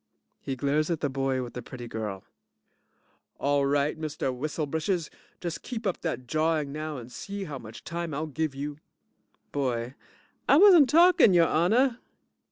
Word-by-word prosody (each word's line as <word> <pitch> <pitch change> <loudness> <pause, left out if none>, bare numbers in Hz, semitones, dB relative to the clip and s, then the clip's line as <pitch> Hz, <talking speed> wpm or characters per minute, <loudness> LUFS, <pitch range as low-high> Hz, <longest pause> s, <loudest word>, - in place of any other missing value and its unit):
(He 135 - -3
glares 145 +4 0
at 165 -3 0
the 145 - 0
boy 135 -1 -1
with 120 - -8
the 125 - -5
pretty 120 0 -9
girl) 105 -4 -5 1.1
All 140 0 +1
right, 145 +2 0
Mr. 150 -4 -2
Whistle 150 +4 -3
britches, 160 +3 -2 0.3
just 170 -2 -4
keep 230 -3 -6
up 190 - -1
dat 130 -7 -3
jawing 155 0 0
now 155 0 -4
and 120 0 -9
see 200 +8 -6
how 150 -7 -6
much 110 -1 -11
time 170 -1 -4
I'll 150 +2 -2
give 155 -1 -3
you! 145 +1 -5 0.7
BOY 125 -3 -2 0.6
I 280 - +7
wasn't 345 -7 +8
talking, 330 - +6
your 170 -1 +6
honor. 230 - +2
150 Hz, 165 wpm, -27 LUFS, 135-170 Hz, 1.1 s, wasn't